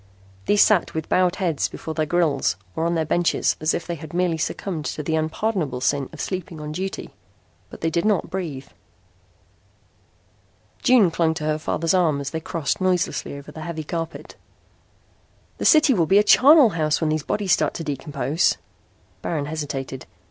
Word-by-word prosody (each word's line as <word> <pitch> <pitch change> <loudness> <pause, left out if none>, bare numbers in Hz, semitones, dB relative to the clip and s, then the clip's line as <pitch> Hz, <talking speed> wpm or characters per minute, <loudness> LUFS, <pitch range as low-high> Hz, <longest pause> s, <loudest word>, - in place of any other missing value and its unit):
These 205 - +6
sat 205 -7 +2
with 160 -1 -4
bowed 180 -1 +2
heads 170 -7 0
before 160 - -6
their 155 -1 -1
grills 160 - +1 0.2
or 165 - 0
on 170 - 0
their 160 -1 0
benches 175 +2 +1
as 155 +1 +1
if 170 - -4
they 175 - -3
had 160 0 -9
merely 175 -2 +1
succumbed 160 -1 -3
to 150 - -4
the 160 +2 -1
unpardonable 160 - -1
sin 140 +1 0
of 160 - -12
sleeping 180 -4 -4
on 150 0 -6
duty. 190 +5 -5 0.6
But - - -12
they 165 - 0
did 170 - 0
not 210 -4 +1
breathe. 160 -8 -4 2.2
June 230 -9 +5
clung 165 -1 +1
to 160 - -5
her 155 0 0
father's 165 +2 -1
arm 165 -6 +2
as 140 -1 -4
they 160 - -3
crossed 160 +1 -3
noiselessly 180 -5 0
over 140 +1 -11
the 160 - -9
heavy 160 -1 -5
carpet. 165 +1 -6 1.2
"The - - -3
city 305 -3 +6
will 170 -7 +1
be 195 - +5
a 205 - +6
charnel 275 +4 +7
house 155 -5 0
when 160 -2 0
these 155 0 0
bodies 200 +5 -2
start - - +2
to 165 - -4
decompose." 145 +1 0 0.6
Baron 155 -4 -2
hesitated. 145 -4 -5
160 Hz, 175 wpm, -23 LUFS, 155-180 Hz, 2.2 s, charnel